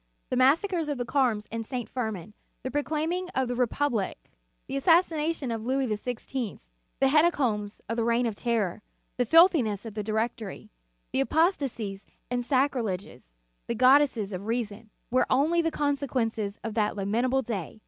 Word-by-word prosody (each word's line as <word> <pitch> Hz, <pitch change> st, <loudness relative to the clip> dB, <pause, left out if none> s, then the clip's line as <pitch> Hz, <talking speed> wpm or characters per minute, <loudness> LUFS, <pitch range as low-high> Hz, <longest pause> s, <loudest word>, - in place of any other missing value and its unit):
The -, -, +1 dB
massacres 320 Hz, +6 st, +3 dB
of 290 Hz, -, -1 dB
the 245 Hz, -, -2 dB
Carmes 240 Hz, -5 st, +1 dB
and 230 Hz, 0 st, -3 dB
St. 245 Hz, 0 st, -4 dB
Firmin, 215 Hz, -6 st, -4 dB, 0.3 s
the 260 Hz, -, -3 dB
proclaiming 315 Hz, +6 st, -1 dB
of 265 Hz, -1 st, +1 dB
the 245 Hz, -, -2 dB
Re 250 Hz, 0 st, +2 dB
public, 235 Hz, -6 st, -2 dB, 0.3 s
the 270 Hz, -, -5 dB
assassination 320 Hz, -2 st, +2 dB
of 225 Hz, -1 st, -3 dB
Louis 265 Hz, +3 st, 0 dB
XVI., 245 Hz, +1 st, -3 dB, 0.4 s
the 270 Hz, -, +4 dB
hecatombs 260 Hz, -10 st, +2 dB
of 230 Hz, -, -3 dB
the 230 Hz, -, +1 dB
Reign 235 Hz, +1 st, +2 dB
of 230 Hz, -, -1 dB
Terror, 215 Hz, -4 st, -1 dB, 0.4 s
the 245 Hz, -2 st, +1 dB
filthi 330 Hz, -, +6 dB
ness 210 Hz, -1 st, -3 dB
of 225 Hz, -, -6 dB
the 210 Hz, -, -3 dB
Directory, 220 Hz, 0 st, -3 dB, 0.4 s
the -, -, +1 dB
apostasies 270 Hz, -, 0 dB, 0.2 s
and 245 Hz, 0 st, 0 dB
sacrileges, 240 Hz, -, -1 dB, 0.4 s
the 235 Hz, -, -1 dB
goddesses 255 Hz, -4 st, +4 dB
of 190 Hz, +3 st, -5 dB
Reason, 225 Hz, -2 st, -3 dB, 0.2 s
were 255 Hz, -, +3 dB
only 310 Hz, +6 st, +3 dB
the 330 Hz, -, +1 dB
consequences 255 Hz, -9 st, -1 dB
of 225 Hz, -1 st, -4 dB
that 210 Hz, -1 st, 0 dB
lamentable 240 Hz, +7 st, +1 dB
day. 215 Hz, -4 st, -5 dB
245 Hz, 160 wpm, -27 LUFS, 220-280 Hz, 0.4 s, filthi